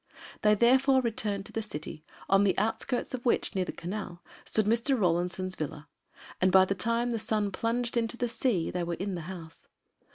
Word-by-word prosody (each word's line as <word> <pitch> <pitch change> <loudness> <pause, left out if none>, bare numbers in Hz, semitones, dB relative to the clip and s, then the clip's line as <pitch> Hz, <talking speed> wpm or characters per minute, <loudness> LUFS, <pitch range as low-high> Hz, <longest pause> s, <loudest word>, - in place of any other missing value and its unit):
They, 210 0 +5
therefore, 260 +4 +4
returned 215 -5 -2
to - - -9
the 225 - -2
city, 155 -6 -7 0.2
on 195 +1 +4
the 195 -2 +2
outskirts 235 +5 -1
of 250 -1 -4
which, 240 - +1
near 190 -2 0
the - - -4
Canal, 180 -1 -6 0.2
stood 215 - +1
Mr. 235 +4 +2
Rawlinson's 180 +1 +1
villa, 150 0 -6 0.5
and 185 0 +4
by 190 0 +7
the 195 - 0
time 230 +5 0
the 230 - -1
sun 215 -2 0
plunged 230 +4 -1
into 235 0 0
the 245 - 0
sea 230 -6 0
they 180 - -2
were 170 0 -2
in 195 +2 -4
the 175 - -4
house. 165 -3 -10
210 Hz, 195 wpm, -29 LUFS, 185-235 Hz, 0.5 s, by